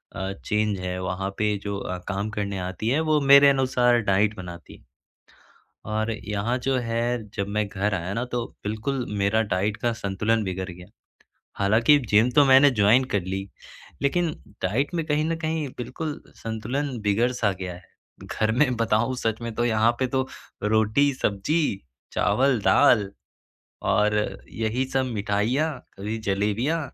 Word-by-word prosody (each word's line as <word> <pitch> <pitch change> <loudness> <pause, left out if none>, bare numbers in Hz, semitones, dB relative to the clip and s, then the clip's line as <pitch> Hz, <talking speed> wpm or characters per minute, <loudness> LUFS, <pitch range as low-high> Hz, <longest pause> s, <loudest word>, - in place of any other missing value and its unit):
अ, 95 +1 -3
change 105 -2 0
है 90 0 -3
वहाँ 95 +1 -2
पे 105 -1 +1
जो 100 -1 -3
अ, 90 -2 -4
काम 100 +1 -2
करने 100 -2 -3
आती 90 +5 -3
है 140 +5 +2
वो 150 - +4
मेरे 140 +1 +8
अनुसार 125 -3 +3
डाइट 105 +2 +2
बनाती 85 -2 -9
है। - - -25 1.1
और 110 +1 0
यहाँ 110 +2 -2
जो 130 +1 0
है 115 -1 -2
जब 100 - -2
मैं 105 -1 +1
घर 100 +1 -1
आया 90 +1 -3
ना 115 - -1
तो 120 -1 -3 0.2
बिल्कुल 115 +5 -2
मेरा 100 +3 +2
डाइट 105 0 -1
का 120 - 0
संतुलन 110 +1 -1
बिगड़ 95 -1 -4
गया। 90 0 -10 0.7
हालाँकि 110 +9 +4
जिम 110 +4 +5
तो 145 - +6
मैंने 135 +1 +7
जॉइन 110 +2 +4
कर 100 - +2
ली 95 +2 -4 0.5
लेकिन 170 +5 +1 0.3
डाइट 120 - 0
में 165 - 0
कहीं 150 -1 +1
न 165 - 0
कहीं 155 -2 -2
बिल्कुल 135 +5 -5
संतुलन 120 +5 -3
बिगड़-सा 110 +1 +1
गया 90 -1 -4
है। 90 - -13 0.6
घर 110 0 +2
में 130 +2 +2
बताऊँ 115 +3 +1
सच 115 -1 -2
में 115 -1 -4
तो 120 - +1
यहाँ 110 0 +3
पे 130 - +1
तो 130 +1 -1 0.4
रोटी-सब्जी, 110 +2 +1 0.3
चावल-दाल 125 -4 +3 0.8
और 105 0 +2 0.4
यही 115 +4 -1
सब 135 -1 +2
मिठाइयाँ 105 +10 0 0.3
कभी 105 +3 -4
जलेबियाँ 105 +11 0
110 Hz, 155 wpm, -25 LUFS, 100-130 Hz, 1.1 s, मेरे